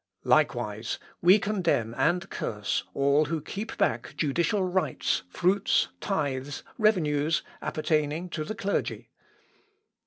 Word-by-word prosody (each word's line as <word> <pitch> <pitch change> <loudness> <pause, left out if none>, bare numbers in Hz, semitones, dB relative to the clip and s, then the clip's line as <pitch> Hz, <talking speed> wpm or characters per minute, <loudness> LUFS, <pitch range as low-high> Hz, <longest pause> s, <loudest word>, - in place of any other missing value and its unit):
_ - - -10
"Likewise 105 +2 +1 0.2
we 185 +4 +7
condemn 175 - 0
and 175 +8 +1
curse 105 -3 -2
all 140 +2 +3
who 160 +2 -2
keep 200 +8 -6
back 115 +1 0
judicial 170 +6 +1
rights, 185 0 0
fruits, 190 - +2
tithes, 145 -6 -2 0.2
revenues, 160 -8 +2 0.2
appertaining 155 +2 0
to 155 -2 -3
the 215 - -5
clergy." 200 0 -2
155 Hz, 115 wpm, -27 LUFS, 140-185 Hz, 0.2 s, we